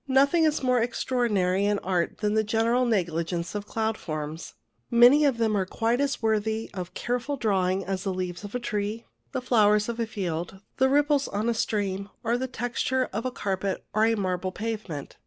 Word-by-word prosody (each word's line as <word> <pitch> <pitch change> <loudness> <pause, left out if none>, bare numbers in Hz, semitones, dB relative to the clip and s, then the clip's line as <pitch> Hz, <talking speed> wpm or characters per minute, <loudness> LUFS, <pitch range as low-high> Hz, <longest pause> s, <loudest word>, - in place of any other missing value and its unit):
Nothing 280 +5 +4
is 305 -3 +1
more 250 -2 +3
extraordinary 215 -6 +1
in 205 0 +2
art 180 0 -1
than 210 -1 +1
the 220 0 +3
general 230 +4 +2
negligence 170 -4 -1
of 205 0 -4
cloud 220 -1 -1
forms. 155 0 -5 0.3
Many 245 +5 +7
of 270 -5 +2
them 220 -2 +1
are 195 - +2
quite 230 +6 0
as 280 -4 -1
worthy 220 0 0
of 180 -3 -6
careful 250 +4 -2
drawing 195 -4 +1
as 190 0 -3
the 195 - -1
leaves 180 0 -4
of 205 +3 -7
a - - 0
tree, 215 0 -3 0.3
the 260 -2 -3
flowers 210 -3 +3
of 235 0 -4
a 230 - 0
field, 180 -3 -4 0.2
the 265 - +4
ripples 290 0 +3
on 210 +3 -2
a - - +2
stream, 200 -3 -1
or 235 +1 +1
the 260 +2 -2
texture 255 +2 -1
of 225 +5 -2
a - - -3
carpet, 195 -4 -2
or 215 +1 +4
a 225 0 +3
marble 185 -2 -1
pavement. 205 -9 -5
215 Hz, 195 wpm, -26 LUFS, 190-245 Hz, 0.3 s, Many